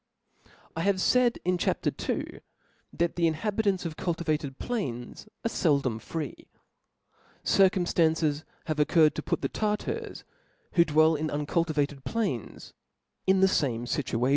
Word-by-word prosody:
I 165 - -2
have 200 +2 +3
faid 245 +4 +3
in 180 0 +1
Chap. - - -1
II. - - -2 0.5
that 170 0 -1
the 170 -1 +3
inhabitants 200 +3 0
of 160 -2 -4
cultivated 155 -5 -2
plains 140 - -4 0.2
are - - +2
feldom 140 - +1
free. 155 +4 -6 1.0
Circuaiftafices 165 -5 +3 0.2
have 155 -2 -2
concurred 155 +1 +4
to - - -4
put - - -2
the - - +2
Tartars 210 -1 -3 0.5
who 170 - +5
dv7ell 155 0 +4
in' 155 0 -1
uncultivated 145 -2 -1
plains, 200 - -3 0.5
in 190 0 +4
the 190 - +7
fame 120 -10 0
fituation. 125 -1 0
160 Hz, 130 wpm, -28 LUFS, 145-185 Hz, 1.0 s, the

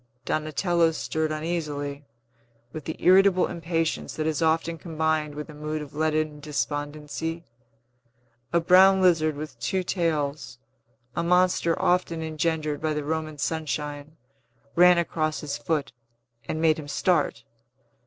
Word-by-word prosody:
Donatello 165 +2 +1
stirred 160 0 -2
uneasily, 150 -3 -3 0.7
with 155 -2 -7
the 160 - -4
irritable 185 0 +5
impatience 165 -1 -2
that 155 - -2
is 155 -1 -1
often 165 +1 +1
combined 160 -2 -1
With 150 0 -6
a 155 - -11
mood 150 +1 -4
of 145 - -12
leaden 155 0 0
despondency. 150 +4 -4 1.1
A 170 - +3
brown 190 +3 +6
lizard 165 -5 +3
with 150 +1 -8
two 190 -2 -1
tails 150 - -2 0.6
a - - 0
monster 180 -1 +2
often 170 -2 +1
engendered 155 -1 -1
by 155 -1 0
the 150 - -2
Roman 155 0 -3
sunshine 150 -1 -3 0.6
ran 180 +1 +7
across 155 -2 -1
his 150 -2 -4
foot, 145 +3 -1 0.6
and 155 - -2
made 160 -1 +3
him 145 - -8
start. - - +1
155 Hz, 130 wpm, -26 LUFS, 150-170 Hz, 1.1 s, ran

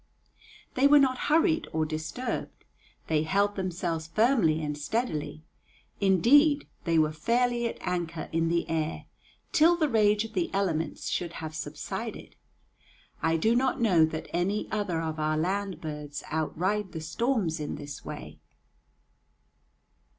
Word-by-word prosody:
They 265 +2 +4
were 295 +1 +7
not 260 -3 +3
hurried 320 +1 +3
or 160 0 +1
disturbed; 155 +11 -4 0.4
they 155 -1 +1
held 200 +5 +1
themselves 175 -4 -3
firmly 215 - +3
and 150 -1 -2
steadily; 155 - -3 0.6
indeed, 280 - +4 0.2
they 165 -2 +2
were 155 -1 +3
fairly 235 +8 +1
at - - -5
anchor 170 -2 -3
in 165 0 +1
the 170 0 0
air 160 -1 -2 0.5
till 335 +3 +5
the 315 -3 +2
rage 215 -3 +3
of 225 - -10
the 180 -4 0
elements 165 -6 -1
should 170 -1 -2
have 160 -2 -6
subsided. 150 -1 -6 0.9
I 160 0 +2
do 220 +8 +2
not 260 +1 +1
know 185 -9 +4
that 155 0 -5
any 190 +5 0
other 195 -6 -1
of 160 -1 -3
our 155 0 +1
land 190 +1 -1
birds 150 -2 -6
outride 185 +5 -1
the 160 - -5
storms 175 0 -1
in 150 - -4
this 145 -1 -8
way. - - -8
175 Hz, 140 wpm, -28 LUFS, 160-225 Hz, 0.9 s, were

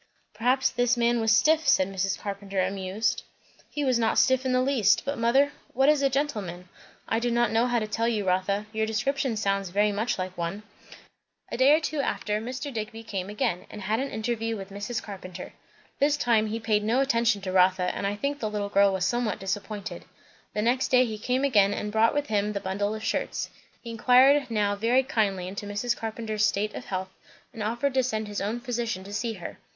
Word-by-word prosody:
"Perhaps 250 +4 +2
this 245 0 +1
man 235 0 +2
was 225 0 +2
stiff," 310 +7 +4
said 190 -9 +4
Mrs. 195 0 -1
Carpenter 200 -1 -4
amused. 195 +3 -1 0.5
"He 295 -1 -2
was 255 -3 +2
not 225 -1 +1
stiff 260 0 +3
in - - +1
the 255 - +3
least; 255 -7 +3
but 280 +1 -1
mother, 265 +5 +3 0.2
what 270 +3 +4
is 300 -2 +4
a 275 - +3
gentleman?" 210 -11 -3 0.4
"I 225 - +1
do 240 +1 0
not 240 -1 +2
know 230 +2 +2
how 245 -1 +1
to 220 - 0
tell 225 +2 -1
you, 215 -4 -1
Rotha. 190 +3 0
Your 220 0 0
description 240 +2 -1
sounds 195 -2 0
very 205 +3 +2
much 215 +4 -1
like 185 0 -4
one." 175 +4 -4 0.9
A - - -3
day 260 +3 +5
or 305 - +6
two 305 -1 -3
after, 210 -4 -1
Mr. 260 +4 -5
Digby 225 0 -5
came 195 -3 -4
again, 195 -4 -2
and 210 - -8
had 215 +4 0
an 275 +1 -2
interview 225 0 -2
with 195 0 -8
Mrs. 205 +4 -4
Carpenter. 185 -3 -8 0.5
This 290 +1 +3
time 230 -5 +2
he 220 +2 -3
paid 215 -2 +1
no 230 +5 +2
attention 230 -5 +2
to 185 - -3
Rotha, 185 0 +3
and 200 - -2
I 200 - -2
think 280 +6 -2
the 215 - -2
little 205 -1 -3
girl 200 0 +4
was 190 -2 -1
somewhat 240 -4 0
disappointed. 200 +1 -5 0.5
The 210 - 0
next 250 +3 +2
day 255 0 +4
he 215 -2 -5
came 255 +5 0
again 205 -7 +4
and 210 - -4
brought 220 +3 +3
with 290 0 0
him 210 -3 0
the 200 - -2
bundle 205 +2 -2
of 215 - -7
shirts. - - -2 0.3
He 235 - -8
inquired 260 +4 +5
now 205 -2 +1
very 235 +5 +2
kindly 200 -8 0
into 200 +2 -6
Mrs. 215 +4 -1
Carpenter's 220 -1 -3
state 210 +1 +1
of - - -7
health, 190 0 -4 0.4
and 225 - -7
offered 235 +6 -1
to 260 - +3
send 220 -4 -2
his 205 -1 -4
own 215 +4 -2
physician 235 -5 -3
to 200 +1 -9
see 230 +2 -2
her. 180 -5 -8
220 Hz, 215 wpm, -26 LUFS, 200-245 Hz, 0.9 s, or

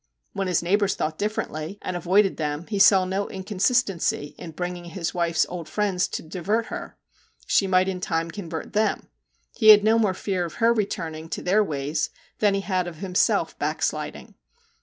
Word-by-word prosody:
When 195 -1 -2
his 180 -2 +1
neighbours 200 +2 +2
thought 155 0 -3
differently, 200 -4 -3
and 185 - -4
avoided 185 +3 +2
them, 150 +1 -3
he 205 0 -3
saw 190 -1 +6
no 190 +2 -2
inconsistency 195 - 0
in 170 - -7
bringing 180 +1 -5
his 170 0 -4
wife's 170 -1 +1
old 170 -3 -7
friends 195 0 0
to - - -5
divert 190 +7 -1
her: - - -7 0.5
she 195 - +2
might 185 0 +3
in 185 -1 -3
time 165 -1 -1
convert 165 -5 -6
them\ 215 +1 0 0.5
he 220 - +1
had 210 -1 +10
no 220 +1 +4
more 205 -4 +2
fear 185 -2 -2
of 170 - -6
her 230 0 +3
returning 165 -7 -3
to - - -4
their 205 +4 +3
ways 150 -2 -2 0.3
than 205 -2 +3
he 195 - -1
had 185 -2 -1
of 175 - -7
himself 185 +1 0
'backsliding.' - - -3
185 Hz, 180 wpm, -24 LUFS, 170-205 Hz, 0.5 s, had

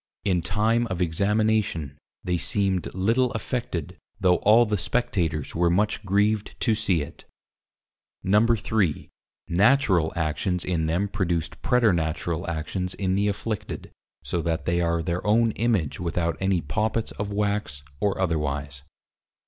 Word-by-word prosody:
In 90 -4 +2
Time 110 +7 +1
of 95 -2 -3
Examination, 100 -3 +1 0.3
they 90 -1 0
seemed 95 +6 0
little 115 +7 +2
affected, 100 - -4 0.2
though 90 -3 +4
all 110 +3 +5
the 105 -1 0
Spectators 85 - -1
were 85 +1 +2
much 105 +5 +1
grieved 105 +2 0
to 115 - +3
see 100 -8 +1
it. 70 - -12 1.0
3. 105 -4 +2 0.4
Natural 95 - +3
Actions 85 +3 -1
in 80 -3 0
them 90 +5 0
produced 85 -5 -2
Preternatural 85 - +1
actions 90 +3 -3
in 95 -2 -1
the 100 +2 +2
Afflicted, 105 +1 -4 0.3
so 85 - -2
that 80 0 -2
they 85 +1 +1
are 85 -1 0
their 85 +2 -2
own 115 +2 +4
Image 105 -10 0
without 85 -1 -1
any 95 -2 +1
Poppits 110 +9 -1
of 100 0 -3
Wax 100 -8 -2 0.2
or 100 -2 0
otherwise. 75 -6 -2
95 Hz, 130 wpm, -25 LUFS, 85-105 Hz, 1.0 s, all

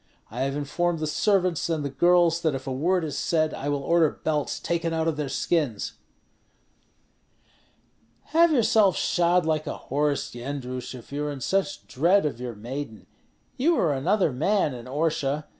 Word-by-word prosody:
I 120 - -6
have 135 +1 -1
informed 165 +4 -1
the 155 - -2
servants 180 +1 +1
and 155 -3 -1
the - - -1
girls 170 +3 +3
that 155 -4 +1
if 135 - -6
a 135 - -3
word 175 +7 +1
is 155 -3 -4
said, 155 -2 0
I 145 - -4
will 145 -1 -1
order 165 0 +3
belts 150 -2 -1
taken 170 -1 -1
out 160 0 0
of 160 - 0
their 150 -2 -3
skins." 140 -8 -1 2.4
"Have 335 +1 +5
yourself 220 - +4
shod 175 0 +2
like 155 -1 0
a - - -4
horse, 145 0 -1
Yendrus, 125 0 -5
if 120 0 -12
you 145 +1 -2
are 150 - -2
in 140 - -6
such 195 +7 -1
dread 170 +7 +2
of 130 -5 -3
your 120 -2 -5
maiden. 120 +1 -7 0.5
You 330 +7 +3
were 160 - +2
another 175 +6 +1
man 155 +4 +1
in 120 -2 -8
Orsha. 150 0 -1
155 Hz, 175 wpm, -25 LUFS, 135-175 Hz, 2.4 s, Have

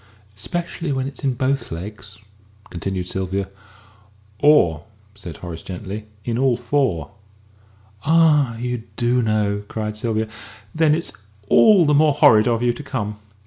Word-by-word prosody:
"Especially 165 - -4
when 130 -1 -1
it's 140 - -8
in 135 -2 0
both 135 +2 -1
legs," 100 +4 -8 0.5
continued 90 +1 -3
Sylvia. 95 +1 -2 0.9
"Or," 115 - +4 0.3
said 95 -5 -10
Horace 85 -2 -8
gently, 95 +4 -7 0.2
"in 120 0 -1
all 130 -3 +2
four." 120 - -1 0.9
"Ah, 150 -7 +4
you 125 0 -3
do 120 +1 +1
know!" 105 -2 0
cried 105 -1 -4
Sylvia. 110 0 -1 0.5
"Then 155 -1 +3
it's 170 - -3 0.4
all 205 -6 +6
the 150 - +3
more 150 0 +4
horrid 110 -5 +6
of 120 0 +1
you 120 -1 +2
to 150 - -8
come!" 105 -7 -4
115 Hz, 140 wpm, -21 LUFS, 100-140 Hz, 0.9 s, all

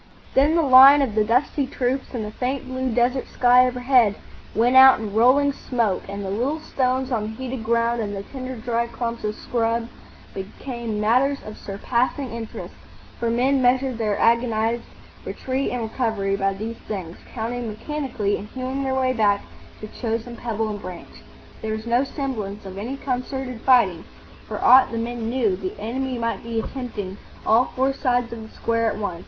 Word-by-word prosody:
Then 290 +4 +4
the 335 - +3
line 275 +1 +8
of 245 -6 -2
the 215 0 +3
dusty 260 +5 +1
troops 260 0 -1
and 220 -3 -3
the 210 - -6
faint 260 +4 -3
blue 260 0 -2
desert 245 +3 +1
sky 250 0 +5
overhead 250 -4 +3 0.4
went 240 +3 +3
out 265 -1 +9
in 215 -2 -5
rolling 260 +6 +4
smoke, 230 -8 -1
and 200 0 -5
the 190 - -3
little 260 +10 -1
stones 260 -2 -1
on 230 -3 +1
the 215 +1 -5
heated 260 -2 -5
ground 235 +1 +1
and 205 -2 -3
the 195 - -5
tinder 260 +2 -7
dry 235 0 -1
clumps 235 0 -4
of 210 0 -2
scrub 230 0 -1 0.4
became 225 +3 -5
matters 255 +6 +2
of 215 - -8
surpassing 240 +6 -2
interest, 230 -1 -7 0.5
for 235 - 0
men 260 +4 +2
measured 255 -1 +2
their 210 -2 0
agonised 230 0 +2 0.4
retreat 265 +1 -2
and 245 -2 -3
recovery 220 -4 -1
by 195 0 +1
these 225 +3 -5
things, 185 -5 -5
counting 240 0 -4
mechanically 225 -3 -2
and 205 - -8
hewing 260 +3 -4
their 265 0 -1
way 260 -1 +1
back 205 -4 +2 0.4
to 215 - -6
chosen 230 +1 -4
pebble 225 -2 -2
and 205 -1 -5
branch. 180 -2 -10 0.4
There 220 0 -2
was 220 +1 -7
no 240 +3 +2
semblance 220 -8 -5
of 190 0 -7
any 250 +7 -4
concerted 255 -2 -4
fighting. 220 -10 +3 0.4
For - - -5
aught 260 +1 +6
the 230 - -3
men 230 0 -3
knew, 235 -6 +1
the 185 0 -6
enemy 255 +4 -3
might 230 0 -2
be 230 -1 -3
attempting 220 -6 -5 0.3
all 230 +3 +4
four 265 +1 +1
sides 245 -3 0
of 230 - -7
the 220 - -10
square 230 0 -1
at - - -4
once. 200 -5 -3
235 Hz, 180 wpm, -23 LUFS, 220-260 Hz, 0.5 s, out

